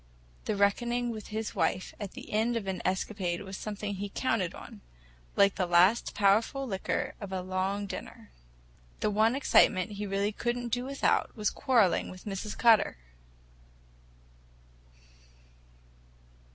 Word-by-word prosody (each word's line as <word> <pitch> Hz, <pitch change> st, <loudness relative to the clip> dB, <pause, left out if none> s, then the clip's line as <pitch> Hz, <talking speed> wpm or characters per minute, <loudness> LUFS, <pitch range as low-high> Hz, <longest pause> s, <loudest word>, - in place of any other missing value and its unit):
The -, -, -1 dB
reckoning 240 Hz, +4 st, +1 dB
with 215 Hz, -2 st, -7 dB
his 220 Hz, 0 st, -4 dB
wife 185 Hz, 0 st, -1 dB
at 205 Hz, -3 st, -6 dB
the -, -, -10 dB
end 225 Hz, +3 st, +1 dB
of 220 Hz, -, -4 dB
an 190 Hz, -1 st, -3 dB
escapade 185 Hz, -1 st, -2 dB
was 190 Hz, 0 st, -7 dB
something 205 Hz, 0 st, -4 dB
he 200 Hz, +1 st, -4 dB
counted 195 Hz, -5 st, -1 dB
on—like -, -, -2 dB
the 185 Hz, -2 st, -1 dB
last 180 Hz, +6 st, +4 dB
powerful 220 Hz, +7 st, +2 dB
liqueur 190 Hz, -4 st, -2 dB
after 195 Hz, -2 st, -5 dB
a 185 Hz, -, -3 dB
long 190 Hz, +2 st, -1 dB
dinner. 195 Hz, -, -8 dB, 0.7 s
The 210 Hz, -, +1 dB
one 220 Hz, +4 st, +3 dB
excitement 210 Hz, -7 st, +4 dB
he 205 Hz, 0 st, -4 dB
really 200 Hz, +1 st, 0 dB
could 240 Hz, +3 st, -2 dB
n't 240 Hz, -2 st, -5 dB
do 245 Hz, 0 st, 0 dB
without 275 Hz, +1 st, 0 dB
was 210 Hz, -1 st, +1 dB
quarreling 235 Hz, -10 st, +2 dB
with 185 Hz, 0 st, -11 dB
Mrs. 205 Hz, +1 st, -5 dB
Cutter! 230 Hz, -, +4 dB
205 Hz, 140 wpm, -29 LUFS, 190-225 Hz, 0.7 s, last